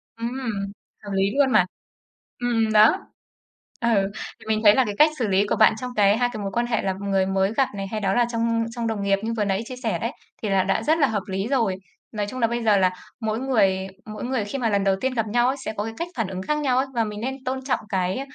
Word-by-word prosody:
Ừm, 230 Hz, +1 st, -3 dB, 0.8 s
hợp 205 Hz, -, -7 dB
lý 195 Hz, 0 st, +2 dB
luôn 275 Hz, -2 st, +4 dB
mà. 185 Hz, -, +5 dB, 0.7 s
Ừm, 225 Hz, -3 st, +1 dB
đó. 215 Hz, +1 st, +5 dB, 0.7 s
Ừ, 205 Hz, -4 st, +2 dB, 0.3 s
thì 220 Hz, -, -15 dB
mình 215 Hz, 0 st, +1 dB
thấy 205 Hz, 0 st, +8 dB
là 260 Hz, -, +4 dB
cái 205 Hz, -, -3 dB
cách 305 Hz, +1 st, +7 dB
xử 235 Hz, -4 st, 0 dB
lý 195 Hz, +1 st, +3 dB
của -, -, 0 dB
bạn 215 Hz, -, +6 dB
trong 250 Hz, -, -4 dB
cái 205 Hz, 0 st, +5 dB
2 245 Hz, 0 st, +2 dB
cái 215 Hz, -3 st, -5 dB
mối 195 Hz, -, -3 dB
quan 240 Hz, +3 st, 0 dB
hệ 230 Hz, -3 st, 0 dB
là 190 Hz, -, 0 dB
người 195 Hz, -1 st, +1 dB
mới 190 Hz, +1 st, +1 dB
gặp 270 Hz, -, +3 dB
này 195 Hz, 0 st, -3 dB
hay 215 Hz, +2 st, -4 dB
đó 195 Hz, -1 st, +1 dB
là 240 Hz, +1 st, +3 dB
trong 230 Hz, 0 st, +1 dB
trong 230 Hz, 0 st, -4 dB
đồng 220 Hz, -3 st, -2 dB
nghiệp 200 Hz, 0 st, +2 dB
như 225 Hz, -, -2 dB
vừa 210 Hz, -, +1 dB
nãy 195 Hz, +2 st, 0 dB
chia 255 Hz, -, -7 dB
sẻ -, -, 0 dB
đấy, -, -, -3 dB, 0.3 s
thì 215 Hz, -, -1 dB
là 190 Hz, -1 st, +3 dB
đã 195 Hz, -, 0 dB
rất 315 Hz, +2 st, +2 dB
là 280 Hz, -, +5 dB
hợp 210 Hz, -3 st, -1 dB
lý 195 Hz, +2 st, -2 dB
rồi. 230 Hz, -9 st, +1 dB, 0.4 s
Nói 210 Hz, -1 st, -2 dB
chung 255 Hz, -, -6 dB
là 230 Hz, -, +4 dB
bây 235 Hz, +1 st, -2 dB
giờ 215 Hz, -2 st, +5 dB
là 185 Hz, -1 st, +4 dB, 0.3 s
mỗi 220 Hz, -1 st, -1 dB
người 195 Hz, -8 st, +2 dB, 0.2 s
mỗi 215 Hz, +2 st, -6 dB
người 250 Hz, -4 st, -1 dB
khi 210 Hz, +7 st, -4 dB
mà 240 Hz, -3 st, +1 dB
lần 200 Hz, -1 st, +1 dB
đầu 195 Hz, -1 st, +3 dB
tiên 260 Hz, 0 st, -1 dB
gặp 225 Hz, -3 st, 0 dB
nhau 240 Hz, +3 st, +2 dB
ấy 265 Hz, -, 0 dB
sẽ -, -, -3 dB
có 205 Hz, -, -2 dB
cái 225 Hz, -, -5 dB
cách 335 Hz, -, -3 dB
phản 225 Hz, -5 st, -1 dB
ứng 185 Hz, -1 st, -5 dB
khác 300 Hz, +9 st, -1 dB
nhau 265 Hz, -4 st, +1 dB
ấy. 265 Hz, -, +1 dB
Và 230 Hz, -1 st, +2 dB
mình 210 Hz, -1 st, -6 dB
nên 265 Hz, +3 st, -4 dB
tôn 260 Hz, 0 st, -3 dB
trọng 265 Hz, -, 0 dB
cái 190 Hz, +2 st, -1 dB
220 Hz, 275 wpm, -24 LUFS, 200-245 Hz, 0.8 s, thấy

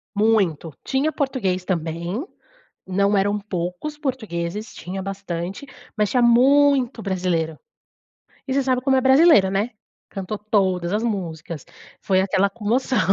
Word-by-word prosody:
Muito, 200 Hz, -8 st, +1 dB
tinha 275 Hz, +4 st, 0 dB
português 250 Hz, -, -1 dB
também, 170 Hz, -, -2 dB, 0.6 s
não 200 Hz, +2 st, +2 dB
eram 205 Hz, +1 st, +1 dB
poucos 185 Hz, -, -4 dB
portugueses, 215 Hz, -, -4 dB
tinha 190 Hz, +2 st, -6 dB
bastante, 195 Hz, +4 st, -5 dB, 0.3 s
mas 210 Hz, -2 st, +1 dB
tinha 250 Hz, +1 st, +2 dB
muito 260 Hz, 0 st, +4 dB
brasileiro 175 Hz, -5 st, -1 dB, 0.9 s
e 260 Hz, -, -1 dB
você 275 Hz, 0 st, +2 dB
sabe 255 Hz, -1 st, +1 dB
como 265 Hz, 0 st, +2 dB
é -, -, +2 dB
brasileiro, 265 Hz, -, +6 dB
né? 205 Hz, +5 st, 0 dB, 0.4 s
Cantou 195 Hz, +1 st, -5 dB
todas 190 Hz, -4 st, 0 dB
as 215 Hz, +3 st, 0 dB
músicas, 170 Hz, -, -4 dB, 0.4 s
foi 190 Hz, -1 st, +2 dB
aquela 195 Hz, +1 st, +2 dB
comoção. 235 Hz, +4 st, -1 dB
200 Hz, 130 wpm, -22 LUFS, 180-255 Hz, 0.9 s, brasileiro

